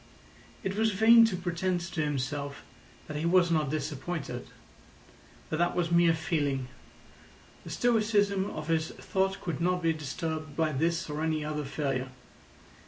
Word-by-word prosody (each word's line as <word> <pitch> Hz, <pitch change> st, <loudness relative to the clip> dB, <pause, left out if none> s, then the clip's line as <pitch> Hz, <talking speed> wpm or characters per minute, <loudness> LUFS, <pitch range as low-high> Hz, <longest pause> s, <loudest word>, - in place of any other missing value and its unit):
It 190 Hz, 0 st, -2 dB
was 220 Hz, 0 st, +2 dB
vain 230 Hz, +3 st, +7 dB
to 220 Hz, -5 st, 0 dB
pretend 180 Hz, 0 st, -1 dB
to 170 Hz, -1 st, -3 dB
himself 140 Hz, 0 st, -3 dB, 0.4 s
that 150 Hz, -, -5 dB
he 150 Hz, -, -3 dB
was 175 Hz, -1 st, +4 dB
not 155 Hz, -4 st, +2 dB
disappointed. 150 Hz, -2 st, -4 dB, 1.0 s
But 155 Hz, -, -3 dB
that 175 Hz, 0 st, +2 dB
was 175 Hz, -1 st, 0 dB
mere 170 Hz, -1 st, +5 dB
feeling; 145 Hz, -5 st, -1 dB, 0.9 s
the -, -, -9 dB
stoicism 210 Hz, -4 st, +2 dB
of 155 Hz, 0 st, -6 dB
his 160 Hz, -1 st, +1 dB
thought 190 Hz, 0 st, -1 dB
could 170 Hz, -3 st, -3 dB
not 180 Hz, 0 st, +1 dB
be 165 Hz, 0 st, +3 dB
disturbed 155 Hz, 0 st, -4 dB
by 160 Hz, -1 st, +2 dB
this 165 Hz, +5 st, 0 dB
or 150 Hz, 0 st, -4 dB
any 155 Hz, -1 st, 0 dB
other 150 Hz, -1 st, -3 dB
failure. 135 Hz, -2 st, -2 dB
165 Hz, 150 wpm, -29 LUFS, 150-180 Hz, 1.0 s, vain